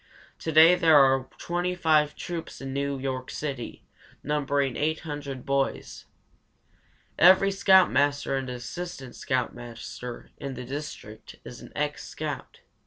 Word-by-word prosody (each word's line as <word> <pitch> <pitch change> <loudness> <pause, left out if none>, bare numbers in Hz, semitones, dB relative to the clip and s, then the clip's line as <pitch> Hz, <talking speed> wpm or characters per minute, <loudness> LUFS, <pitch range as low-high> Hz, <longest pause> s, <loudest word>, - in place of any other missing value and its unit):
To 160 - -3
day 160 +3 +8
there 165 -4 +5
are 135 -1 +4
25 170 -4 +1
troops 170 -2 -6
in 135 -1 -6
New 140 0 -1
York 130 -1 -4
City, 135 -5 -5 0.4
numbering 140 -3 0
800 145 -3 -3
boys. 140 -1 -2 1.1
Every 190 +3 +7
scoutmaster 160 -8 +3
and 135 -1 -3
assistant 130 +2 -7
scoutmaster 125 -2 -5
in 135 -1 -5
the 125 - -7
district 130 -5 -8
is - - -10
an - - -12
ex - - -2
scout. - - -6
140 Hz, 115 wpm, -26 LUFS, 130-160 Hz, 1.1 s, day